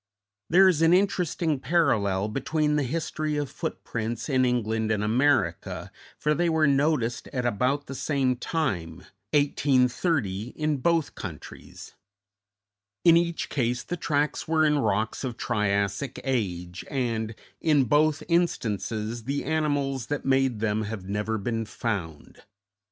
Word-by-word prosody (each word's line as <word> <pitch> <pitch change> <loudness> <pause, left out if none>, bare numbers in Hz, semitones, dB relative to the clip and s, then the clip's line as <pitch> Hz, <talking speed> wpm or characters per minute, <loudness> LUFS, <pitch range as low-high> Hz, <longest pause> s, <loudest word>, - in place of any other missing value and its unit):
There 190 +3 +7
is 170 -4 +3
an 165 +1 +5
interesting 175 -5 +1
parallel 105 - +1
between 150 +6 0
the 150 - +2
history 150 +2 -2
of 145 -2 -2
footprints 115 +3 -4
in 130 -2 +3
England 110 -3 0
and 105 -1 0
America, 110 - +1 0.3
for 150 - +1
they 170 +2 +1
were 160 -1 +3
noticed 140 -4 +1
at 125 -3 -3
about 125 +5 0
the - - -7
same 135 -2 0
time, 90 - -2 0.3
1830, 130 - +1
in 155 -1 0
both 165 +2 +1
countries; 80 -5 -9 1.1
in 170 -1 +8
each 170 0 +1
case 120 -2 -1
the 175 - -4
tracks 150 -3 -1
were 160 -1 +3
in 150 -1 +3
rocks 110 0 0
of 125 -3 -4
Triassic 100 +3 -1
age, 90 -9 -2
and, 115 -4 -2 0.2
in 150 -4 +3
both 150 +5 +2
instances, 115 - -1
the 140 +2 -2
animals 145 -4 -1
that 145 -1 -3
made 135 -4 +2
them 110 -1 +1
have 105 -3 -6
never 105 +2 -1
been 115 +2 -2
found. 100 -8 -5
130 Hz, 135 wpm, -26 LUFS, 110-150 Hz, 1.1 s, in